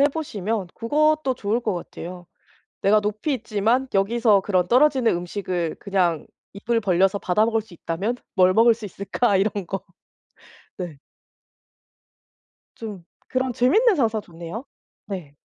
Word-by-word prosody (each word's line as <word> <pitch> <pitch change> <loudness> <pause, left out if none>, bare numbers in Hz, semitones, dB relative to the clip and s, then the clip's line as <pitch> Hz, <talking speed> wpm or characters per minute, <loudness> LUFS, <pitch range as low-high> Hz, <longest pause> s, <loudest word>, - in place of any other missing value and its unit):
해 - - +6
보시면 220 - -3
그것도 300 +2 +1
좋을 220 +2 -1
것 215 -5 -1
같아요. 175 0 -8 0.6
‘내가 210 +2 +5
높이 215 +8 -1
있지만 230 +3 0
여기서 210 +1 +3
그런 185 -3 +1
떨어지는 255 -5 +4
음식을 175 -2 -3
그냥 180 -5 0 0.3
입을 225 +3 -1
벌려서 195 0 +2
받아먹을 220 +5 +2
수 205 -5 -16
있다면 190 +9 -3 0.2
뭘 185 -1 +5
먹을 230 +1 +6
수 220 -1 -11
있을까?‘ 200 +3 0
이런 200 -1 0
거. 195 +2 -4 0.9
네. 175 -6 -6 1.8
좀 210 -6 -8 0.2
그런 255 -1 -1
재밌는 405 - +4
상상 225 -6 +1
좋네요. 170 +9 -8 0.4
네. 170 -8 -7
210 Hz, 270 characters per minute, -23 LUFS, 185-235 Hz, 1.8 s, 해